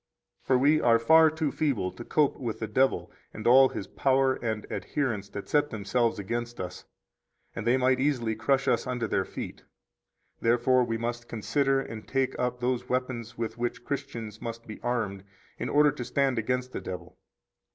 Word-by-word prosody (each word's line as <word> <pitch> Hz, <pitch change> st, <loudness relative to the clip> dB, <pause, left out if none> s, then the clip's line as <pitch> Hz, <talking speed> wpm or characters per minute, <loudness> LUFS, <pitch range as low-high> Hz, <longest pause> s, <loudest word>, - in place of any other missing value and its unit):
For 130 Hz, -, +2 dB
we 150 Hz, +4 st, +4 dB
are 115 Hz, -1 st, +5 dB
far 160 Hz, +8 st, +6 dB
too 155 Hz, -2 st, -2 dB
feeble 130 Hz, -13 st, 0 dB
to -, -, -9 dB
cope 150 Hz, +3 st, +1 dB
with 115 Hz, -4 st, -3 dB
the 110 Hz, -, -2 dB
devil 130 Hz, +4 st, +1 dB, 0.2 s
and 110 Hz, -, -7 dB
all 130 Hz, +2 st, +7 dB
his 100 Hz, -, -5 dB
power 135 Hz, -1 st, +2 dB
and 110 Hz, -4 st, -3 dB
adherents 115 Hz, -9 st, -2 dB
that 100 Hz, -, -7 dB
set 150 Hz, 0 st, +2 dB
themselves 110 Hz, +2 st, 0 dB
against 120 Hz, +4 st, -4 dB
us, 90 Hz, -1 st, -6 dB, 0.7 s
and 115 Hz, 0 st, -4 dB
they 125 Hz, +2 st, +4 dB
might 130 Hz, 0 st, +2 dB
easily 130 Hz, -5 st, +1 dB
crush 135 Hz, +5 st, +1 dB
us -, -, +2 dB
under 125 Hz, -3 st, -1 dB
their -, -, 0 dB
feet. -, -, -7 dB, 0.8 s
Therefore 120 Hz, +2 st, +3 dB
we 115 Hz, -1 st, -1 dB
must 120 Hz, +1 st, -4 dB
consider 135 Hz, +4 st, +1 dB
and 115 Hz, -5 st, -7 dB
take 135 Hz, -1 st, 0 dB
up 125 Hz, 0 st, -1 dB
those 125 Hz, 0 st, -1 dB
weapons 125 Hz, -2 st, -2 dB
with 115 Hz, 0 st, -4 dB
which 120 Hz, 0 st, 0 dB
31 120 Hz, 0 st, -18 dB
Christians 115 Hz, -7 st, -5 dB
must 115 Hz, 0 st, -6 dB
be 110 Hz, -, -9 dB
armed 110 Hz, -6 st, -2 dB, 0.4 s
in -, -, -2 dB
order 150 Hz, 0 st, +5 dB
to 135 Hz, -3 st, -6 dB
stand 135 Hz, -1 st, +1 dB
against 125 Hz, +3 st, -1 dB
the -, -, -5 dB
devil. 90 Hz, -1 st, -8 dB
120 Hz, 185 wpm, -28 LUFS, 115-135 Hz, 0.8 s, all